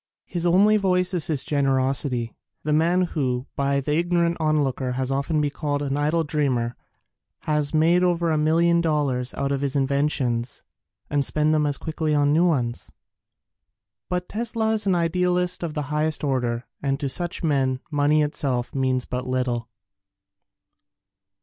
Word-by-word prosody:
His 175 -1 -2
only 205 +5 +5
vice 180 -2 +1
is 175 -4 0
his 145 -4 +3
generosity. 135 -4 0 0.3
The 150 - 0
man 170 +4 +3
who, 130 -7 -2
by 140 0 +1
the 150 +2 -2
ignorant 170 +1 +1
onlooker 140 -5 0
has 130 +1 -2
often 140 +3 0
been 145 -1 0
called 145 -1 -2
an 140 -1 -1
idle 155 +3 +1
dreamer, 130 -6 -1 0.7
has 150 -2 0
made 165 +3 +3
over 170 -2 +1
a - - +2
million 170 +2 +3
dollars 140 -6 0
out 140 - -2
of 140 -1 -1
his 140 0 -1
inventions 135 -3 0 0.2
— - - -49
and 145 -1 +2
spent 150 +2 +2
them 155 -1 +2
as 145 -1 0
quickly 155 -1 -2
on 145 0 +3
new 170 +3 +4
ones. 120 -8 -1 1.2
But 180 0 -2
Tesla 225 0 -1
is 215 -2 +1
an 190 - +3
idealist 180 +1 0
of 165 -3 -4
the 150 - -1
highest 155 0 0
order 125 -4 -1 0.2
and 135 -1 -1
to 145 - -2
such 175 +6 -2
men 135 -4 +1
money 150 +1 +3
itself 135 -5 -2
means 130 -2 0
but 125 0 -4
little. 125 -2 -2
150 Hz, 160 wpm, -23 LUFS, 135-170 Hz, 1.2 s, only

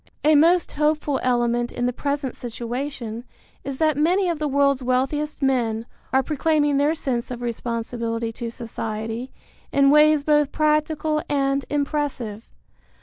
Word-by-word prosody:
A 310 - +5
most 335 +3 +4
hopeful 300 -1 0
element 240 -1 +1
in 245 - -2
the 250 - 0
present 280 -1 -2
situation 240 0 -5 0.4
is 275 -1 -5
that 310 -1 +2
many 355 +5 +2
of 335 -3 -2
the 305 - 0
world's 280 -1 +2
wealthiest 270 +4 -1
men 235 -4 +1 0.3
are 265 +1 +3
proclaiming 295 0 +1
their 290 +3 +2
sense 250 -5 -2
of 245 -1 -6
responsibility 230 -1 -3
to 230 +1 -5
society 225 +1 -5 0.4
in 275 0 +4
ways 300 0 +5
both 295 -1 +3
practical 305 0 +1
and 275 -1 +1
impressive. 280 -7 -2
275 Hz, 140 wpm, -23 LUFS, 240-300 Hz, 0.4 s, A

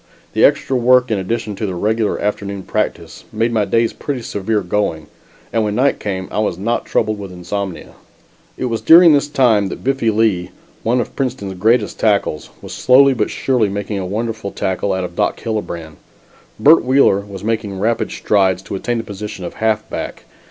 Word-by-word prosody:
The - - +2
extra 135 - +3
work 125 0 +4
in 105 - +1
addition 105 +2 -3
to 105 - -2
the 95 - -4
regular 110 +4 0
afternoon 100 -1 -3
practice, - - -3
made 115 +2 0
my 110 -3 +1
days 115 +3 +1
pretty 135 -5 -4
severe 105 0 -1
going 90 -4 -1 0.5
and 115 - +2
when 105 -1 -1
night 135 +4 +2
came 95 -2 -4
I - - -2
was 105 -5 0
not 115 +5 -1
troubled 110 -1 0
with 100 -2 -7
insomnia. 90 +1 -5 0.6
It - - -2
was 115 -2 -2
during 165 0 +8
this 145 0 +2
time 115 -8 +2
that - - -8
Biffy 135 -3 +1
Lea, 105 -5 +1 0.3
one 120 +2 +1
of 115 - -7
Princeton's 125 -8 -3
greatest 110 +4 +1
tackles, 100 -8 0
was - - -8
slowly 135 +2 +5
but 110 -4 -1
surely 125 -6 0
making 100 0 -3
a 95 - -3
wonderful 110 +1 -3
tackle 95 +1 -2
out 95 0 -1
of 90 -1 -6
Doc - - 0
Hillebrand. 85 -9 -5 0.6
Bert 150 +9 +6
Wheeler 130 -6 +4
was 100 -1 -9
making 110 -3 -2
rapid 115 +3 0
strides 95 -3 +1
to - - -8
attain 120 +5 -2
the 115 - -3
position 100 -2 -7
of - - -6
halfback. 110 -1 -2
105 Hz, 185 wpm, -18 LUFS, 95-115 Hz, 0.6 s, during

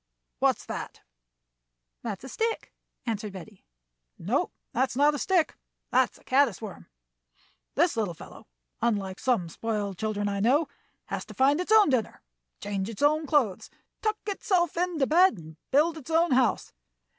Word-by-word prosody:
"What's - - +2
that?" - - -6 1.0
"That's 210 -3 -5
a - - -7
stick," 450 - -2 0.3
answered 215 -3 -3
Betty. 195 +1 -11 0.5
"No, - - 0 0.2
that's 255 +1 0
not 290 +3 +4
a 290 - -3
stick, 360 -1 +2 0.4
that's - - +2
a - - -22
caddis 260 -7 +3
worm. 215 -4 -9 0.9
This 330 +2 +3
little 205 -7 -1
fellow, - - -13 0.3
unlike 200 -5 -1
some 235 -10 +1
spoiled 205 0 -3
children 215 -2 -1
I 200 0 -1
know, 270 +9 +3 0.4
has - - -4
to - - -12
find 280 +5 +3
its 365 - -4
own 430 -8 +7
dinner, 240 -5 -1 0.4
change 200 0 -3
its 225 +3 -5
own 305 +1 +3
clothes, 255 - +1 0.3
tuck 430 0 0
itself 375 -5 0
into 340 -5 +1
bed, 335 - +5
and 160 -1 -12
build 315 +4 +3
its 300 - -13
own 330 0 +3
house. 250 -3 +2
260 Hz, 155 wpm, -27 LUFS, 205-320 Hz, 1.0 s, own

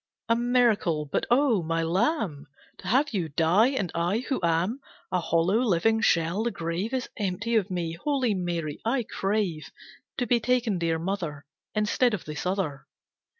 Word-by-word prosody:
A 230 - +3
miracle! 235 -10 +2
But 140 - -2
Oh! 245 -5 +3
My 165 0 -1
Lamb! 180 - 0 0.3
To 185 - -9
have 265 +7 +2
you 175 -6 -1
die! 170 - +4
And 230 -11 -2
I, 180 +9 0
who 270 - 0
am 170 +8 +1 0.3
A 180 - +2
hollow, 170 +5 +2
living 225 0 +2
shell, 170 0 +2
the 235 - +1
grave 170 +3 -3
Is 260 -2 -2
empty 210 +3 -1
of 210 -3 +2
me. 175 -3 -2
Holy 255 - 0
Mary, 170 -5 -3
I 240 +2 +1
crave 195 -7 -2 0.5
To 245 - 0
be 240 +1 +3
taken, 235 -4 +1
Dear 165 -1 0
Mother, 165 -5 -4 0.3
Instead 215 +2 +2
of 190 - -9
this 150 +3 -4
other." 155 -8 -2
195 Hz, 165 wpm, -27 LUFS, 165-235 Hz, 0.5 s, die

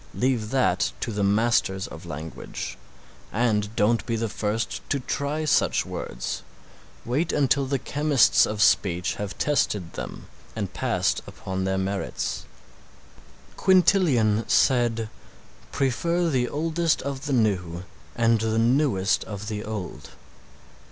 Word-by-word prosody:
Leave 125 -4 0
that 125 - +1
to - - -3
the 105 -1 -1
Masters 100 -2 +2
of 80 +4 -10
language, 80 0 -6 0.6
and 110 -2 0
don't 115 +2 +2
be 115 - 0
the 115 0 -1
first 105 +2 -2
to 140 - +1
try 145 +4 -2
such 150 - +2
words, - - -5 0.6
wait 145 +8 0
until 140 -1 +2
the 135 +1 0
chemists 145 -1 +3
of 105 0 +1
speech 90 -5 +2
have 105 -1 -5
tested 105 - 0
them - - -7 0.3
and - - -4
passed - - 0
upon 95 0 -4
their 95 0 0
merits. 95 +1 -3 1.1
Quintilian 155 - +4
said 120 -3 +3 0.6
"Prefer 170 +6 +1
the 125 -4 +1
oldest 165 +2 0
of 140 +1 -4
the 140 - 0
new 90 -7 0 0.3
and 115 -1 +3
the 110 0 0
newest 115 -4 +2
of 105 0 -6
the 105 -1 -4
old." 105 -5 -6
115 Hz, 125 wpm, -25 LUFS, 105-140 Hz, 1.1 s, Quintilian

